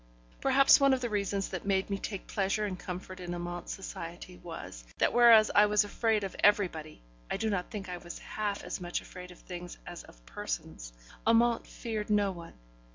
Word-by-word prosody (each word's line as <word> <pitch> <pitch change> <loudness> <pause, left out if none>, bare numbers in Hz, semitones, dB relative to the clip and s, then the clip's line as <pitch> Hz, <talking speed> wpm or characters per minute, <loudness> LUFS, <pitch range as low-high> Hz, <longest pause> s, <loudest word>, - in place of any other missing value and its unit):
Perhaps 275 0 +6
one 275 -1 +5
of 255 - -5
the 240 -2 -2
reasons 200 -1 -1
that 185 - -5
made 195 0 0
me 195 - -1
take 200 -2 -5
pleasure 200 +1 0
and 185 -3 -4
comfort 185 +1 -7
in 175 -1 -5
Amante's 175 0 -5
society 175 -1 -8
was, 165 - -8
that - - +2
whereas 235 -3 +7
I 210 +1 +6
was 210 0 +4
afraid 215 0 0
of 195 - -4
everybody 170 - +2 0.3
(I - - -1
do 220 +1 -1
not 180 -3 -2
think 205 -3 -6
I 180 -1 -5
was 175 0 -9
half 205 -2 -3
as - - -5
much 175 0 -2
afraid 180 0 -10
of 180 - -13
things 175 -1 -8
as 175 -1 -7
of - - -18
persons), - - -5 0.4
Amante 230 +1 +4
feared 220 -3 -4
no 205 -2 +3
one. 170 -2 -10
195 Hz, 195 wpm, -30 LUFS, 175-215 Hz, 0.4 s, whereas